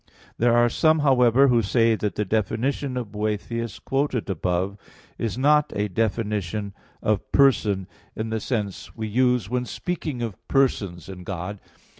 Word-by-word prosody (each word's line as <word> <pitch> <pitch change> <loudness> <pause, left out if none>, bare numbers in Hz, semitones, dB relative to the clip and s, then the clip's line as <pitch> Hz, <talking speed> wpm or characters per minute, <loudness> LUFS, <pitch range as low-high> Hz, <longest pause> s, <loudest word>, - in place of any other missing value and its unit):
There 120 0 +4
are 120 0 +5
some, 155 +6 +3
however, 130 0 +5
who 120 -2 +4
say 115 +2 +3
that 105 -1 -2
the 105 - -1
definition 120 +6 -1
of 120 -5 -4
Boethius, 110 +1 -3
quoted 135 -6 -1
above 90 +2 -1
(A. - - -16
1), 100 - -18 0.4
is 115 -1 -2
not 150 +3 +3
a 105 0 0
definition 105 -1 -1 0.3
of 105 -2 0
person 105 -8 +3 0.3
in 110 0 -3
the 110 - 0
sense 105 -4 -4
we 110 -1 -4
use 125 -1 +2
when 125 +2 -1
speaking 155 -5 -4
of 110 -5 -5
persons 105 -10 +1
in 95 -2 -8
God. 95 +2 -5
110 Hz, 160 wpm, -24 LUFS, 100-125 Hz, 0.4 s, are